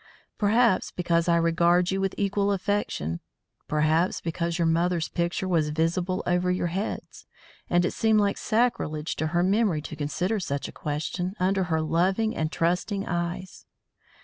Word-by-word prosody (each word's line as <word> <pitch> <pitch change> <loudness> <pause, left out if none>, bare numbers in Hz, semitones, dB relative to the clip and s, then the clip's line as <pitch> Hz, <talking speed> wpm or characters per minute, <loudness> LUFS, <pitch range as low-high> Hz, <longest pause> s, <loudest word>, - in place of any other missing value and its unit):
Perhaps 220 0 +3
because 170 -1 0
I 170 - +5
regard 170 +2 +3
you 195 0 -1
with 195 -1 -1
equal 200 0 +1
affection. 195 - -1 0.5
Perhaps 155 +4 +2
because 170 0 -2
your 170 - +1
mother's 170 0 +1
picture 175 +2 -1
was 165 -4 +1
visible 170 +4 0
over 180 +1 +1
your 180 -2 0
heads, 195 +4 -5 0.4
and 175 0 +3
it - - 0
seemed 220 -1 +3
like 200 -1 +1
sacrilege 215 -10 0
to 155 - 0
her 175 +2 +1
memory 195 -5 +2
to 155 - -7
consider 175 +8 -1
such 140 -6 -3
a - - -9
question 170 +5 -3
under 190 +1 +1
her 160 -2 0
loving 190 +7 +1
and 155 0 -1
trusting 180 +4 0
eyes. 175 +2 -4
175 Hz, 155 wpm, -26 LUFS, 165-195 Hz, 0.5 s, I